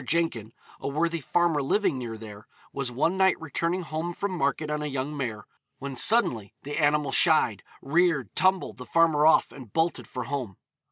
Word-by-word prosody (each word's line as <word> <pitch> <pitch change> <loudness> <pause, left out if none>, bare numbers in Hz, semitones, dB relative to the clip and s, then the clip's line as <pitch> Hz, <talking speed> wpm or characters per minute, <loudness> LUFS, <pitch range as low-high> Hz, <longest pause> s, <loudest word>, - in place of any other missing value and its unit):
Jenkin, 130 -8 -1 0.3
a - - -5
worthy 165 +3 -1
farmer 170 0 +1
living 140 0 0
near 115 -3 -6
there, 105 -1 -11 0.3
was 140 -2 -3
one 160 +9 0
night 190 0 +3
returning 165 +3 -2
home 165 +2 -4
from 200 -1 -3
market 150 -2 -1
on 150 0 -2
a 150 - -3
young 140 +1 -3
mare, 115 -7 -4 0.3
when 140 -1 -6
suddenly 130 - +3
the 145 +3 -4
animal 145 -2 +2
shied, 145 - +4 0.2
reared, 150 - +1
tumbled 185 - +1
the 125 - -9
farmer 160 -2 +3
off, 160 - +4
and 125 -7 -12
bolted 165 +1 0
for 125 - -5
home. 125 -7 -5
150 Hz, 175 wpm, -26 LUFS, 130-170 Hz, 0.3 s, shied